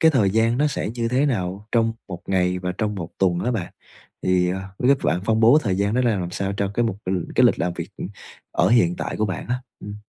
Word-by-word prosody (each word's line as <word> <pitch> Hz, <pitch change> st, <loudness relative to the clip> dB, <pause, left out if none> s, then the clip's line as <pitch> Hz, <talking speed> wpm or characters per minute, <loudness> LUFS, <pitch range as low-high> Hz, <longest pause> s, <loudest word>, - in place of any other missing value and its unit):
cái 160 Hz, -, +6 dB
thời 110 Hz, -9 st, +3 dB
gian 115 Hz, +3 st, +2 dB
nó 150 Hz, -, +3 dB
sẽ 140 Hz, -7 st, -2 dB
như 115 Hz, -1 st, -1 dB
thế 130 Hz, +4 st, +2 dB
nào 100 Hz, -3 st, -2 dB
trong 115 Hz, -1 st, +3 dB, 0.2 s
một 90 Hz, -1 st, -6 dB
ngày 90 Hz, -1 st, +1 dB
và 90 Hz, 0 st, -3 dB
trong 105 Hz, -1 st, -1 dB
một 85 Hz, -4 st, -5 dB
tuần 90 Hz, -2 st, +2 dB
hả 120 Hz, -, -1 dB
bạn? 105 Hz, -8 st, -3 dB, 0.5 s
Thì, 90 Hz, -1 st, +2 dB
ờ, 95 Hz, +1 st, -3 dB, 0.2 s
biết 135 Hz, +2 st, +4 dB
bạn 85 Hz, +3 st, +1 dB
phân 110 Hz, 0 st, +2 dB
bố 120 Hz, +7 st, +7 dB
thời 95 Hz, -2 st, 0 dB
gian 100 Hz, +2 st, 0 dB
nó 125 Hz, -, +2 dB
ra 120 Hz, -2 st, +3 dB
làm 90 Hz, -2 st, -3 dB
sao 100 Hz, +2 st, -2 dB
cho 100 Hz, -1 st, -1 dB
cái 120 Hz, -, +2 dB
mục 100 Hz, -4 st, -1 dB
ừm, 90 Hz, -2 st, -1 dB
cái -, -, +6 dB
lịch -, -, +2 dB
làm 90 Hz, -, 0 dB
việc, 85 Hz, +1 st, -6 dB
ừm, -, -, -5 dB, 0.4 s
ở 90 Hz, -, +3 dB
hiện 90 Hz, -7 st, +3 dB
tại -, -, -4 dB
của 110 Hz, -, +1 dB
bạn 95 Hz, -, -4 dB
á? 125 Hz, +1 st, -2 dB, 0.2 s
Ừm. 100 Hz, 0 st, -7 dB
100 Hz, 270 wpm, -23 LUFS, 90-115 Hz, 0.5 s, bố